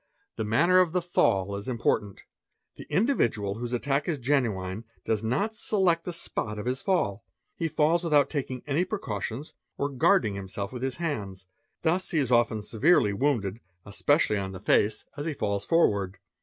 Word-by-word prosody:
The 110 - -2
manner 165 +13 +4
of 175 -3 +3
the 180 - +1
fall 100 - +1
is 100 +1 -6
important. 110 -5 -1 0.5
The - - -11
individual 115 - +1
whose 120 0 -4
'attack 140 +3 0
is 165 -4 0
genuine, 115 -7 -1 0.2
does 110 -1 0
not 165 - 0
select 190 -6 +1
the 180 - -3
spot 110 -10 -3
of 105 - -5
his 125 +1 -1
fall, 115 - 0 0.3
he 165 - -1
falls 160 +3 +2
without 150 -4 +3
iking 130 -4 -3
any 150 +4 +1
precautions 140 - -4 0.2
or 140 - -1
guarding 125 -5 +3
himself 100 +2 -5
with 125 - -6
his 130 0 -1
hands; 105 - -4 0.4
thus 175 +3 +1
he 165 - 0
is 135 -5 +1
en 115 -3 +3
severely 115 - +3
wounded, 110 -4 0 0.3
especially 105 +3 +2
on 95 -1 -4
the 95 - -7
face, 105 +2 +2
as 145 +2 -3
he 155 - -2
falls 100 -4 -2
forward. 100 - +2
125 Hz, 170 wpm, -27 LUFS, 105-160 Hz, 0.5 s, manner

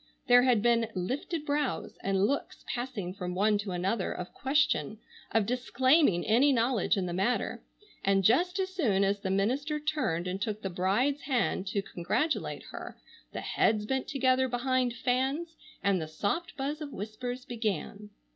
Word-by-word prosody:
There 245 -1 +7
had 245 -4 +3
been 235 -1 +3
lifted 280 - -3
brows 290 -1 -1
and 195 0 +2
looks 280 +6 -2
passing 240 -7 -4
from 180 -2 -5
one 205 +2 +3
to 205 -1 -4
another, 185 +3 -1
of 180 - -6
question, 265 - +1 0.3
of 225 -2 +2
disclaiming 255 - +3
any 250 +6 +4
knowledge 235 -5 +2
in 190 - 0
the 175 - -3
matter, 195 +7 0 0.4
and 195 0 +3
just 350 - +3
as 375 -1 -2
soon 220 - +2
as 200 +1 +1
the 190 - -3
minister 260 +11 0
turned 260 - -1
and 185 +2 -3
took 215 -1 -3
the 195 - -2
bride's 210 +11 +1
hand 245 -7 0
to 200 +1 -1
congratulate 195 - -1
her - - -8 0.3
the - - -5
heads 210 -1 +1
bent 265 +3 -1
together 260 -1 +2
behind 250 0 0
fans 270 +7 -1 0.3
and 195 -3 +2
the 155 - -4
soft 205 - -2
buzz 290 +3 -3
of 295 -2 -5
whispers 245 +5 -5
began. 210 -2 -3
235 Hz, 165 wpm, -30 LUFS, 195-270 Hz, 0.4 s, There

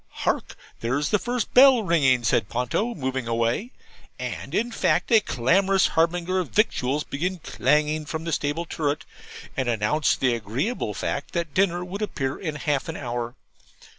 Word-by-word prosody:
'Hark, - - -2 0.2
theres 135 +6 -1
the 210 - +2
first 240 0 -2
bell 260 -2 +7
ringing! 135 -9 +3
'said 105 -1 +1
Ponto, 125 - -1
moving 130 -4 -3
away; 115 - 0 0.5
and, - - -5
in 235 +3 0
fact, - - +1
a 225 - +8
clamorous 190 - +2
harbinger 175 +3 +1
of 180 - -3
victuals 150 - +1
began 180 +6 -3
clanging 150 +1 0
from 160 +1 -4
the 165 - -3
stable 150 +3 -1
turret, 150 -2 -2 0.5
and 130 -4 -1
announced 120 +7 +1
the 130 -2 +2
agreeable 115 - -2
fact 140 - -3
that 170 -4 -2
dinner 180 -2 +1
would 195 +3 -6
appear 140 -10 -2
in 155 -5 -4
half 145 -1 -1
an 160 - -4
hour. 120 -1 -4
150 Hz, 160 wpm, -25 LUFS, 130-185 Hz, 0.5 s, a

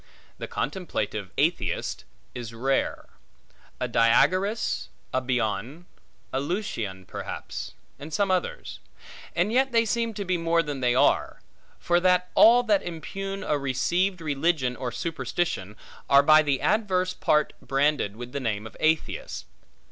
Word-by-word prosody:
The - - -5
contemplative 110 - -3
atheist 140 - 0 0.3
is 115 -2 -7
rare: 135 +4 -1 0.7
a 125 - -1
Diagoras, 185 - +2 0.2
a 130 - +1
Bion, 125 - -2 0.5
a 130 - +1
Lucian 135 - -3
perhaps, - - -6 0.3
and 150 +3 -8
some 195 +4 +1
others; 185 -1 -2 0.6
and 175 +5 +1
yet 265 +1 +3
they 230 -1 +3
seem 230 0 -1
to 200 - -4
be 180 -1 +1
more 165 0 +2
than 145 -3 -4
they 125 -1 +2
are; - - +2 0.4
for 175 0 +2
that 180 0 +2
all 240 +2 +7
that 210 -4 +3
impugn 195 +4 -5
a 150 - 0
received 175 +8 0
religion, 145 -4 0
or 125 +1 -4
superstition, 130 - -3 0.3
are 140 0 +7
by 155 +1 +7
the 140 -3 0
adverse 185 -4 +1
part 150 0 +1
branded 135 -5 +1
with 120 +2 -8
the 140 - -3
name 110 -4 -2
of 110 - -10
atheists. 160 0 -1
155 Hz, 140 wpm, -26 LUFS, 125-185 Hz, 0.7 s, all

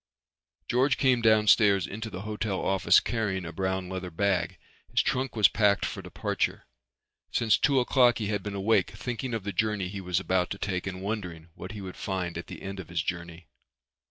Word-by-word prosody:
George 130 +3 +2
came 130 -3 +3
downstairs 105 -3 +5
into 110 +4 -6
the 90 -2 -7
hotel 105 -2 -2
office 95 -2 +4
carrying 100 -5 -2
a 80 - -5
brown 95 +1 -2
leather 95 0 -5
bag. 95 +1 0 0.3
His - - +2
trunk 130 0 -1
was 105 -4 +6
packed 105 -2 +2
for - - -5
departure. - - -2 0.6
Since 110 -3 +2
two 140 -2 +3
o'clock 125 -1 +4
he 110 - -2
had 105 -1 -1
been 100 +1 -5
awake 100 +3 +2
thinking 125 0 -4
of 110 - -4
the 100 0 -4
journey 105 -1 0
he 100 0 -6
was 90 -2 0
about 95 -1 0
to 100 - -4
take 95 -2 -3
and 95 0 -5
wondering 90 -6 -5
what 90 +4 -8
he 105 - -7
would 95 -1 -8
find 90 -3 -3
at 85 - -6
the - - -9
end 95 0 -6
of 90 - -8
his 85 0 -1
journey. 85 -1 -5
100 Hz, 195 wpm, -28 LUFS, 90-110 Hz, 0.6 s, was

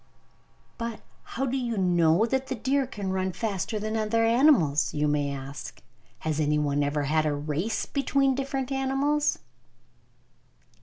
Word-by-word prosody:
"But 230 -1 -4 0.4
how 270 - +1
do 255 - -2
people 245 -4 -1
know 175 +1 +3
that 265 +2 -1
the 265 - -2
deer 270 +3 0
can 200 -6 -4
run 190 -1 -1
faster 205 0 -2
than 215 +1 -3
other 225 +1 +1
animals?" 230 - +3
you 150 0 +1
may 145 -1 0
ask. 140 +1 -7 0.4
"Has 155 -1 -1
anyone 150 -1 +1
had 150 +2 +1
a 145 - 0
race 155 +9 -2
between 275 -1 +1
different 270 0 -3
animals?" 270 +2 +1
215 Hz, 140 wpm, -27 LUFS, -, 0.4 s, know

